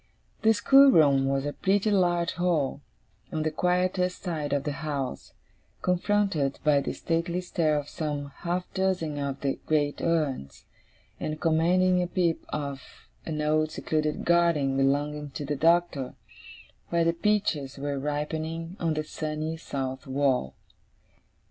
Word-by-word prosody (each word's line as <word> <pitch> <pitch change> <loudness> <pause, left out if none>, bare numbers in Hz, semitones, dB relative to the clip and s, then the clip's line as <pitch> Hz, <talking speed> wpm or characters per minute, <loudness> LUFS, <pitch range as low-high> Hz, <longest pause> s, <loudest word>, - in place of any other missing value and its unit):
The 220 - +5
schoolroom 160 - +6
was 135 0 0
a 145 - -2
pretty 200 +5 +1
large 175 -3 +2
hall, 165 -6 0 0.5
on 155 -1 -1
the 155 - 0
quietest 180 +2 0
side 155 -6 -3
of 140 -1 +1
the 150 - -2
house, 140 - -4 0.5
confronted 180 -6 +1
by 145 -2 +4
the - - -3
stately 170 +1 -1
stare 165 -4 0
of 145 -1 -3
some 145 -3 -4
half 180 +1 -2
dozen 185 -6 -1
of 140 -1 -3
the 140 -1 -1
great 145 -2 +1
urns, 150 - -1 0.5
and 155 0 -3
commanding 180 +3 +3
a 180 - -1
peep 175 -2 0
of 140 -2 -4 0.5
an 155 -2 -2
old 155 +1 +2
secluded 155 -1 -2
garden 170 -6 +3
belonging 145 +2 0
to 145 - -4
the 145 +1 -2
Doctor, 165 -3 +2 0.7
where 170 -1 +2
the 165 - +3
peaches 170 -8 0
were 140 0 -3
ripening 160 +4 -3
on 165 -2 0
the 155 - -1
sunny 155 +1 -4
south 135 -4 -5
wall. 130 - 0
155 Hz, 140 wpm, -27 LUFS, 145-175 Hz, 0.7 s, schoolroom